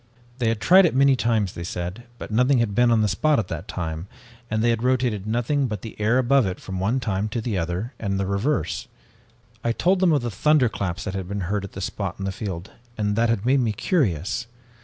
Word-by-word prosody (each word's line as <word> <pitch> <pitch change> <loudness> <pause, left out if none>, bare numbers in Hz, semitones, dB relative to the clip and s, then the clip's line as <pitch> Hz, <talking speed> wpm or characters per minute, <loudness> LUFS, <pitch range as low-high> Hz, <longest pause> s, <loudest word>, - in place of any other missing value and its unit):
"They 115 -2 +2
had 115 -1 -1
tried 185 +6 +6
it 155 - -3
many 135 0 +5
times, 110 -5 0
they 85 - -6
said, 90 +6 -5
but - - -8
nothing 125 +5 +3
had 115 -4 +1
been 120 +3 +4
on 115 -2 +4
the - - +3
spot 145 +11 +2
at 105 -5 -1
that 85 +5 -5
time 80 0 -4 0.4
and 110 +1 0
they 120 - +4
had 115 -1 -1
rotated 125 -5 0
nothing 120 +5 0
but 105 -4 -5
the 110 - -8
air 110 +4 +3
above 130 -2 +3
it 90 - -4
from 95 -1 -6
the - - -3
one 115 +7 +1
time 105 -3 -1
to 110 - -2
the 110 -4 -2
other, 90 +9 -3
and 100 -2 -1
the 95 - 0
reverse. 115 +7 -1 0.8
I 115 - +1
told 180 +9 +2
them 185 -2 +4
of 145 -5 +2
the 120 - -2
thunderclaps 110 - +1
that 95 - -4
had 95 -2 -4
been 100 0 -3
heard 100 +2 -1
at 100 - -8
the 95 - -6
spot 100 -1 -3
in 95 - -4
the 95 - -1
field 95 -2 -6 0.3
and 105 -1 0
that 115 +1 +2
had 115 -2 0
made 135 +2 +4
me 115 -4 +1
curious. 105 - 0
110 Hz, 245 wpm, -24 LUFS, 95-125 Hz, 0.8 s, tried